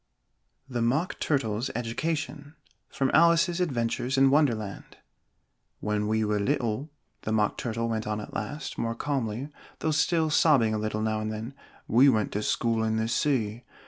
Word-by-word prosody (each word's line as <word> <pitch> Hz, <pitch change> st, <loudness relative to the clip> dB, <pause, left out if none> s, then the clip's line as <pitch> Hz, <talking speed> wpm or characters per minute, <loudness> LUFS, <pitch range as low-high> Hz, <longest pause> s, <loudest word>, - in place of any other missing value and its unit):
THE 120 Hz, -3 st, -3 dB
MOCK 135 Hz, +10 st, 0 dB
TURTLE'S 125 Hz, -4 st, 0 dB
EDUCATION 145 Hz, +5 st, -3 dB, 0.3 s
From 135 Hz, -1 st, 0 dB
'Alice's 170 Hz, +2 st, +4 dB
Adventures 125 Hz, -3 st, -1 dB
in 135 Hz, 0 st, +5 dB
Wonderland' 115 Hz, -9 st, 0 dB, 0.8 s
"When 105 Hz, 0 st, -1 dB
we 110 Hz, 0 st, +1 dB
were 105 Hz, 0 st, 0 dB
little," 130 Hz, +3 st, -1 dB, 0.3 s
the 110 Hz, -, -3 dB
Mock 105 Hz, -1 st, +2 dB
Turtle 115 Hz, -2 st, -2 dB
went 110 Hz, -2 st, -2 dB
on 105 Hz, 0 st, -1 dB
at 105 Hz, -, -8 dB
last, 140 Hz, +7 st, -5 dB
more 115 Hz, 0 st, -1 dB
calmly, 130 Hz, -1 st, -2 dB, 0.3 s
though 160 Hz, -, -1 dB
still 160 Hz, +1 st, +2 dB
sobbing 135 Hz, -8 st, +4 dB
a 110 Hz, -, -1 dB
little 110 Hz, 0 st, -2 dB
now 110 Hz, 0 st, 0 dB
and 110 Hz, 0 st, -3 dB
then, 110 Hz, +4 st, -6 dB, 0.3 s
"we 130 Hz, +5 st, +6 dB
went 110 Hz, -5 st, +1 dB
to 105 Hz, -, -2 dB
school 115 Hz, +1 st, 0 dB
in 110 Hz, 0 st, 0 dB
the 110 Hz, 0 st, 0 dB
sea. 120 Hz, -3 st, 0 dB
115 Hz, 160 wpm, -27 LUFS, 110-145 Hz, 0.8 s, we